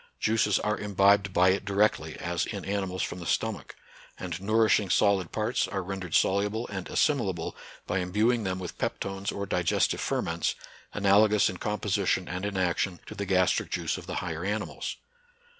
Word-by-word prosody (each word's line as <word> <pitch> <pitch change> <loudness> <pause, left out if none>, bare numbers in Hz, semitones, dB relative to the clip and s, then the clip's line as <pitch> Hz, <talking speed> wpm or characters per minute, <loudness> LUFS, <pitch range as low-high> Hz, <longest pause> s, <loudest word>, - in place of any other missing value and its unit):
Juices 105 -2 +2
are 105 0 -1
imbibed 100 -1 +3
by 90 +1 +4
it 95 +1 +1
directly, 100 +1 +1
as - - -2
in - - -5
animals 95 -2 -2
from 90 - -4
the 85 - -7
stomach; - - -2 0.4
and 90 -1 -5
nourishing 110 -1 +3
solid 95 -2 +2
parts 110 +3 0
are 95 -2 -3
ren 95 +1 -4
dered 90 -3 -3
soluble 105 +4 +1
and 95 -3 -5
assimilable 100 - 0 0.3
by 95 - -1
imbuing 105 +6 +1
them 95 -1 -2
with 90 -2 -7
peptones 95 +1 -2
or 100 - -4
digestive 90 -3 +1
ferments, - - -1 0.4
analogous 105 +1 +4
in 90 - -8
composition 100 -2 0
and 95 +3 -3
in 100 -2 -4
action 90 0 0
to - - -8
the 100 -1 -4
gastric 95 -1 +2
juice - - -1
of - - -9
the - - -4
higher 85 0 -4
animals. 105 +3 -3
100 Hz, 170 wpm, -28 LUFS, 95-105 Hz, 0.4 s, by